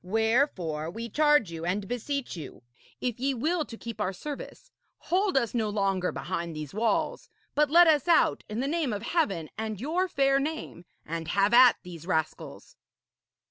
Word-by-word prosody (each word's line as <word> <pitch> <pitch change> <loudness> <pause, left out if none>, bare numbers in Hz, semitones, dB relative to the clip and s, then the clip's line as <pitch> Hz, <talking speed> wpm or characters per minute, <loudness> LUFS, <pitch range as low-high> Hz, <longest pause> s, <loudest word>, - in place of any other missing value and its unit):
Wherefore, 195 - 0
we 230 +6 -6
charge 295 - +3
you 165 -1 -6
and 195 +3 -2
beseech 245 +2 -3
you, 150 -6 -9 0.4
if 245 -2 -2
ye 270 +1 0
will 315 +6 0
to 230 - -10
keep 230 -2 -7
our 195 -1 -1
service, 300 - -8 0.3
hold 375 -2 0
us 235 -5 0
no 225 -3 0
longer 195 -3 0
behind 170 -3 -4
these 150 -2 -6
walls, 220 +2 -1 0.2
but 300 -1 +2
let 345 +3 +7
us 310 -2 +3
out, 325 -1 +3
in 215 +3 -3
the 270 - -1
name 305 -5 0
of 205 +1 -4
Heaven 200 - -1
and 220 -2 -3
your 335 - 0
fair 275 -4 +2
name, 290 - -5 0.2
and 165 0 -5
have 200 +5 +2
at 245 0 +8
these 170 -2 -10
rascals.' 160 -3 -3
230 Hz, 175 wpm, -28 LUFS, 185-290 Hz, 0.4 s, at